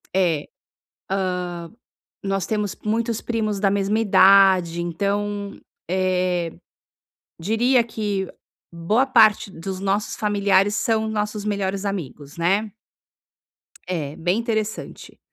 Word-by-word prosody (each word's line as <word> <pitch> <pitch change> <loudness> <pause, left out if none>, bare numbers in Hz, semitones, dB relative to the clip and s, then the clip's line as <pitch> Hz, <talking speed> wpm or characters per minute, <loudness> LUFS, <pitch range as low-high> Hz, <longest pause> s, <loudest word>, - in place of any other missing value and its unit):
É. 170 -6 +2
Hã, - - -18 1.8
nós 195 -2 -1
temos 210 -2 -2
muitos 225 +1 -1
primos 215 -4 -2
da 195 -1 +3
mesma 200 +2 +1
idade, 190 -5 +5
então, 200 +4 -2 0.3
eh, 180 -2 0 0.9
diria 235 +7 +2
que 210 -4 -3 0.5
boa 210 +10 +1
parte 220 -6 +4
dos 185 +2 -6
nossos 200 +2 -1
familiares 205 -1 +2
são 220 -1 +1
nossos 210 -1 -2
melhores 200 -1 -2
amigos, 150 -7 -5
né. 195 +6 +1 1.2
É, 155 -5 -3
bem 180 +6 0
interessante. 220 -2 -4
200 Hz, 100 wpm, -22 LUFS, 185-215 Hz, 1.8 s, idade